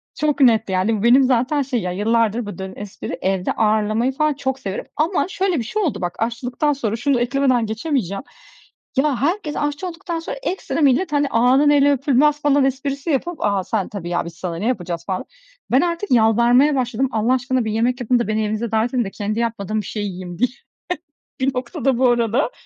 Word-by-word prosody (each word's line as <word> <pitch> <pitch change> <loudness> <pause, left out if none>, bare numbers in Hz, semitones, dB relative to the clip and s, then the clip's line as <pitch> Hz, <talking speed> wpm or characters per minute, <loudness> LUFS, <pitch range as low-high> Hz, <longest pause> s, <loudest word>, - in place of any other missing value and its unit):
çok 300 -1 0
net, 225 -5 +4
yani, 190 +4 +1
bu - - -4
benim 255 +3 +6
zaten 260 +3 +2
şey 255 -4 -1
ya, 180 0 -3
yıllardır 225 +3 +1
bu 205 - -7
dönen 190 0 -7
espri 205 -1 -7
evde 190 -1 0
ağırlamayı 215 +3 +1
falan 305 +3 +1
çok 265 -1 -3
severim 195 -4 -5
ama, 345 +4 +1
şöyle, 380 -3 0
bir - - -2
şey 425 - -2
oldu 310 - -1
bak 175 0 -3
aşçılıktan 245 +6 -1
sonra 225 -5 -2
şunu 255 +1 +1
eklemeden 255 -2 +2
geçemeyeceğim, 220 - -2 0.7
ya, 275 -2 +2
herkes 320 0 -1
aşçı 295 +5 -2
olduktan 335 -1 -5
sonra - - -6
ekstra 365 -3 -2
millet, 290 +5 +3
hani, 290 -1 +2
"Ağanın 255 +5 +4
eli 285 0 +5
öpülmez." 285 +2 +2
falan 285 -2 +3
esprisi 275 +3 -2
yapıp 330 +5 0
"A, 200 -2 +1
sen 205 -2 -2
tabii 195 -6 -6
ya, 175 -1 -1
biz 170 - -8
sana 175 -2 -5
ne 210 +6 -2
yapacağız?" 175 -8 -2
falan. 185 -2 -3 0.5
Ben 260 - +5
artık 345 +3 -2
yalvarmaya 240 +5 +4
başladım 255 0 0
"Allah 225 +2 +1
aşkına 255 -1 0
bir 215 - -1
yemek 245 +3 0
yapın 245 +1 +2
da 235 - -1
beni 215 0 0
evinize 215 +1 -2
davet 225 +3 +1
edin 245 - +2
de 195 - -6
kendi 215 +3 -3
yapmadığım 215 -2 -2
bir - - -12
şey 210 - -4
yiyeyim." 180 -3 -6
diye. 250 +1 +3 0.9
Bir 265 0 0
noktada 250 +1 -1
bu 255 0 +4
arada 240 - +1
245 Hz, 200 wpm, -20 LUFS, 215-280 Hz, 0.9 s, benim